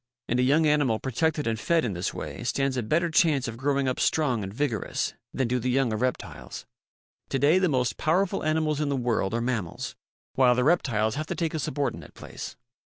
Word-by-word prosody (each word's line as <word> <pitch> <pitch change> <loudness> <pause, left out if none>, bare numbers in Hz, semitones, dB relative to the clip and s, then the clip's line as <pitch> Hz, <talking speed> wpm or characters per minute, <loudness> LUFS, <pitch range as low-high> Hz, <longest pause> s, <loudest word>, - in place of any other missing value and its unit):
And 120 - 0
a - - +4
young 145 +5 +4
animal 145 -7 +3
protected 150 +5 -1
and 115 -1 -1
fed 165 +3 +2
in 110 - -2
this 90 +1 -2
way - - -6
stands 135 -1 0
a 125 - 0
better 165 +10 +1
chance 155 -6 +3
of 115 - -5
growing 135 +2 0
up 130 - -1
strong 130 -8 +1
and 95 - -5
vigorous 120 -1 -2 0.2
than 130 - -1
do 125 +1 0
the 125 +2 -1
young 125 -2 +2
of 110 - -2
reptiles. 105 -11 -4 0.6
To 135 - 0
day 150 +7 +4
the 185 -2 +2
most 125 -6 0
powerful 180 +4 +1
animals 155 -1 +1
in 150 - 0
the 140 - 0
world 115 -5 0
are 115 - 0
mammals 115 -9 -3 0.4
while 125 -2 +4
the 125 - +2
reptiles 120 -9 +2
have 155 +1 -3
to - - -3
take 165 -2 -1
a - - -1
subor 145 -1 -1
dinate - - -11
place. - - -8
130 Hz, 220 wpm, -26 LUFS, 115-155 Hz, 0.6 s, a